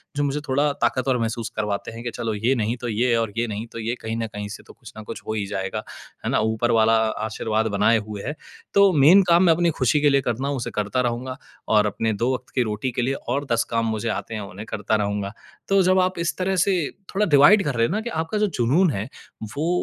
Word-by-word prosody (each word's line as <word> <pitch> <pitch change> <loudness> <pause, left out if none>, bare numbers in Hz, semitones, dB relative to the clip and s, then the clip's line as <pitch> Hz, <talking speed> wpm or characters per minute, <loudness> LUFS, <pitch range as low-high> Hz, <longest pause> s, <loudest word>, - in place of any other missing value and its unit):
जो 145 - 0
मुझे 145 +1 -1
थोड़ा 145 +2 +2
ताकत 130 0 +1
और 130 -2 +2
महसूस 115 0 -2
करवाते 105 -1 -2
हैं 115 +1 -9
कि 120 - -3
चलो, 115 -2 -2
ये 115 +6 +1
नहीं, 115 0 -1
तो 120 0 -5
ये 120 +2 +1
और 115 -3 -1
ये 120 - +1
नहीं, 110 +2 -5
तो 115 - -7
ये, 115 +2 -2
कहीं 110 0 -4
न 115 - -2
कहीं 105 -1 -6
से 105 - -9
तो - - -13
कुछ 115 -5 -14
न 110 - -7
कुछ 115 - -8
हो 110 - -1
ही 105 -2 -2
जाएगा, 95 -1 -4 0.4
है - - 0
ना? - - +2
ऊपर 110 +2 0
वाला 115 0 +4 0.3
आशीर्वाद 110 0 -1
बनाए 115 +3 +4
हुए 105 -2 -6
है। 145 +4 -4 0.4
तो 200 -1 +6
मेन 160 +7 +7
काम 170 +1 +5
मैं 170 - +6
अपनी 170 +1 +2
खुशी 130 +4 +2
के 145 - +5
लिए 140 -1 +3
करता 125 +2 -2
हूँ, 140 - -1
उसे 120 - -4
करता 105 +5 -1
रहूँगा 125 +2 -3 0.3
और 105 -1 +4
अपने 110 +2 -1
दो 120 +5 0
वक़्त 125 -1 -6
की 125 - +3
रोटी 110 +3 -3
के 120 - -2
लिए 130 +3 0
और 135 +2 -3
10 115 -1 +3
काम 115 -1 0
मुझे 110 +1 -2
आते 115 - -4
हैं, 105 - -4
उन्हें 100 +1 -8
करता 105 +1 -1
रहूँगा। 100 -1 -2 0.4
तो 195 0 +4
जब 185 +1 +4
आप 185 0 +1
इस 170 0 -1
तरह 190 +1 0
से 190 +2 +2 0.4
थोड़ा 205 +2 +2
डिवाइड 170 +6 +6
कर 145 -4 -2
रहे 115 0 +2
हो - - -5
ना 215 - 0
कि 235 - -5
आपका 165 +2 -2
जो 210 0 +2
जुनून 145 +10 +3
है, 105 -1 -3 0.5
वो 160 +3 0
120 Hz, 260 wpm, -23 LUFS, 110-145 Hz, 0.5 s, मेन